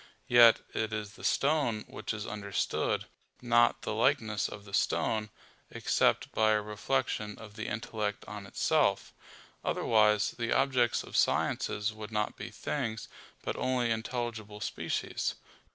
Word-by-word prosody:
Yet 120 Hz, -2 st, +7 dB
it 110 Hz, 0 st, -1 dB
is 105 Hz, -1 st, -4 dB
the 110 Hz, -, -14 dB
stone 140 Hz, -7 st, +1 dB
which -, -, -5 dB
is 110 Hz, -1 st, -4 dB
understood, 100 Hz, -3 st, -1 dB, 0.3 s
not 120 Hz, -1 st, +3 dB
the -, -, -2 dB
likeness 110 Hz, -4 st, +1 dB
of 105 Hz, -1 st, -9 dB
the 100 Hz, -, -13 dB
stone; 110 Hz, +1 st, +1 dB, 0.4 s
except -, -, +1 dB
by 110 Hz, 0 st, +3 dB
a 105 Hz, -, +2 dB
reflection 105 Hz, 0 st, -2 dB
of 110 Hz, -2 st, -11 dB
the 110 Hz, -, -5 dB
intellect 105 Hz, -1 st, -3 dB
on 105 Hz, -1 st, -7 dB
itself: -, -, +1 dB, 0.5 s
otherwise, 105 Hz, -1 st, +3 dB
the 120 Hz, -1 st, -3 dB
objects 130 Hz, -3 st, +2 dB
of -, -, -10 dB
sciences 105 Hz, +2 st, +1 dB
would 110 Hz, 0 st, -8 dB
not 105 Hz, -1 st, -1 dB
be -, -, -7 dB
things, 115 Hz, -7 st, -3 dB, 0.3 s
but -, -, -2 dB
only 125 Hz, -2 st, +1 dB
intelligible 110 Hz, -2 st, -3 dB
species. 110 Hz, -, -2 dB
110 Hz, 135 wpm, -31 LUFS, 105-120 Hz, 0.5 s, Yet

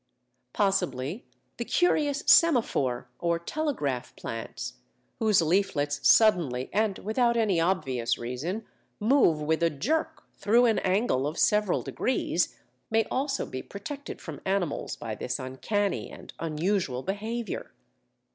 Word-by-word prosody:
Possibly 185 Hz, -, -1 dB, 0.3 s
the 235 Hz, -, -2 dB
curious 295 Hz, -1 st, +1 dB
Semaphore 180 Hz, -, +4 dB
or 170 Hz, -1 st, +1 dB
Telegraph 170 Hz, -, -3 dB
Plants, 115 Hz, -, -6 dB, 0.4 s
whose 215 Hz, -6 st, +4 dB
leaflets 155 Hz, -5 st, +1 dB
suddenly 165 Hz, -, +4 dB
and 210 Hz, -1 st, +1 dB
without 235 Hz, +2 st, +1 dB
any 205 Hz, -7 st, +2 dB
obvious 135 Hz, -9 st, 0 dB
reason 150 Hz, -, -4 dB, 0.3 s
move 215 Hz, -, +4 dB
with 160 Hz, +2 st, 0 dB
a 170 Hz, -, +4 dB
jerk 280 Hz, -, -2 dB
through 235 Hz, +4 st, +3 dB
an 225 Hz, -2 st, +3 dB
angle 185 Hz, -, +1 dB
of 155 Hz, -, -5 dB
several 210 Hz, 0 st, +2 dB
degrees, -, -, -1 dB, 0.3 s
may 225 Hz, 0 st, +3 dB
also 275 Hz, +1 st, -1 dB
be 130 Hz, -, -6 dB
protected 275 Hz, +8 st, -7 dB
from 155 Hz, -4 st, -8 dB
animals 190 Hz, -6 st, -1 dB
by 115 Hz, -2 st, -5 dB
this 125 Hz, +3 st, -3 dB
uncanny 190 Hz, +11 st, -2 dB
and -, -, -11 dB
unusual 165 Hz, -4 st, -1 dB
behaviour. 215 Hz, +2 st, -4 dB
190 Hz, 120 wpm, -28 LUFS, 145-225 Hz, 0.4 s, Semaphore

